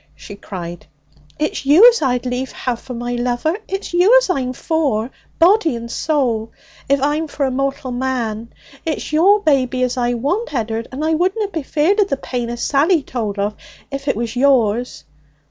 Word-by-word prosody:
she 205 - -10
cried, 175 -4 -8 0.5
'it's 305 - -2
you 310 - +7
as 485 -6 +4
I'd 250 -3 0
lief 250 +1 -3
have 245 -2 -3
for 255 - -8
my 240 +1 -3
lover! 245 +7 -1
It's 390 -1 -5
you 375 +8 +6
as - - +2
I'm 260 -7 -1
for, 265 -5 -1 0.3
body 335 - +4
and 235 0 -7
soul, 240 -9 0 0.4
if 280 0 +3
I'm 295 +4 0
for 285 -1 -2
a 265 - -1
mortal 275 0 -2
man! 240 -3 -3 0.3
It's 315 -1 -4
your 395 +7 +5
baby 260 -6 +1
as 250 +1 -1
I 245 0 0
want, 300 - -2
Ed'ard, 225 -1 -2
and 280 +4 -3
I 320 - +2
wouldna 380 +6 0
be 330 -5 -3
feared 315 +9 +1
o' - - +4
the 275 - -2
pain 245 -3 -4
as 240 0 -4
Sally 300 +3 +2
told 215 -6 -4
of 205 +1 -1 0.4
if 275 +1 -5
it 275 - +2
was 230 +2 -3
yours. 245 -3 +2
265 Hz, 185 wpm, -19 LUFS, 240-315 Hz, 0.5 s, you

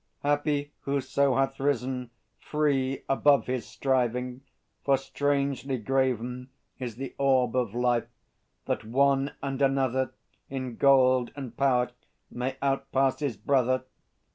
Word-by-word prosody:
Happy 145 0 0
whoso 140 -1 +1
hath 135 0 0
risen, 130 -2 -1 0.3
free, 135 -3 0
Above 140 +1 +4
his 125 -1 -3
striving. 125 -1 -1 0.4
For 140 -1 +4
strangely 140 -1 -1
graven 125 0 -1 0.3
Is 120 -4 -5
the 135 +2 -6
orb 130 -3 +3
of 120 -4 0
life, 120 -2 +1 0.6
that - - -1
one 135 +4 +2
and 135 0 -3
another 130 -1 +1 0.3
In 130 -3 -4
gold 130 -3 +4
and 130 -5 -7
power 125 -2 +2 0.4
may 125 +2 -2
outpass 135 -1 +1
his 140 -8 -2
brother. 130 -2 +1
130 Hz, 115 wpm, -28 LUFS, 125-140 Hz, 0.6 s, Above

